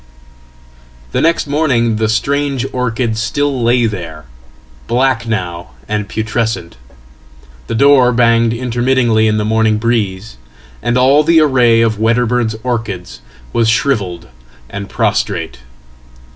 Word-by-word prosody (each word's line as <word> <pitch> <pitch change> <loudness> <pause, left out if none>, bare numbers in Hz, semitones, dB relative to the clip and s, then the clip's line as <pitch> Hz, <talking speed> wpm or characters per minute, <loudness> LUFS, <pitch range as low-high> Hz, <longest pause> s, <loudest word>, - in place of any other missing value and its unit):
The - - 0
next 165 +1 +1
morning 135 -7 +1
the 110 0 0
strange 140 +3 -1
orchid 120 -2 -2
still 135 +3 -1
lay 120 +1 +3
there, 85 -8 -5 0.6
black 125 -1 0
now 85 - -4
andputrescent. 110 -2 -3 0.9
The - - -3
door 135 0 +5
banged 115 -1 +3
intermittently 120 -1 +1
in 110 0 +1
the 105 - -1
morning 110 0 +1
breeze, 110 -2 -2 0.4
and 120 +1 0
allthe 150 +6 +4
array 125 -6 +3
of 110 -2 0
Wedderburn's 115 0 +1
orchids 115 -8 -4 0.3
was 115 -1 +2
shrivelled 105 -10 -1 0.4
and 100 0 -6
prostrate. - - -2
115 Hz, 110 wpm, -14 LUFS, 110-125 Hz, 0.9 s, door